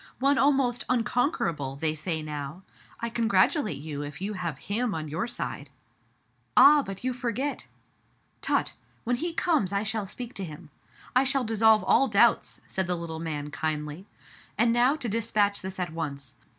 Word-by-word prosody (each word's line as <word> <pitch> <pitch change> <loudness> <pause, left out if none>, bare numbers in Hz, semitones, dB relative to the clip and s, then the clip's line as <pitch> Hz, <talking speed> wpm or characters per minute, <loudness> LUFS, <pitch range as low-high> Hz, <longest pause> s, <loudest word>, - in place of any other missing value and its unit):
One 275 +1 +3
almost 270 -3 +3
unconquerable, 210 - 0
they 155 +2 0
say 160 0 -3
now. 150 +3 -6 0.4
I 235 - -1
congratulate 225 - +2
you 145 0 -5
if 145 0 -7
you 200 +3 -3
have 170 -7 -4
him 220 +4 -2
on 155 -1 -4
your 165 +10 -2
side. 140 -10 -4 0.5
" 120 0 -32
Ah! 295 +1 +8
but 195 -5 -7
you 255 0 0
forget! 250 +3 -3 0.4
" - - -40
Tut - - 0 0.2
— - - -36
when 245 +1 0
he 340 +6 -2
comes 315 - +1
I 200 +1 0
shall 220 -1 -2
speak 245 +4 -6
to 195 - -4
him. 155 -2 -9 0.4
I 255 - +6
shall 270 0 +1
dissolve 220 -1 +4
all 270 - +4
doubts/* 220 +2 +3
said 190 -2 -2
the 180 - 0
little 165 -1 -5
man 150 -3 -4
kindly. 150 +4 -3 0.5
"And 230 +2 +4
now 245 +4 +4
to 280 -6 -3
dispatch 210 -2 +1
this 190 0 -6
at 175 -3 -3
once. 140 -5 -5
200 Hz, 175 wpm, -27 LUFS, 155-240 Hz, 0.5 s, Ah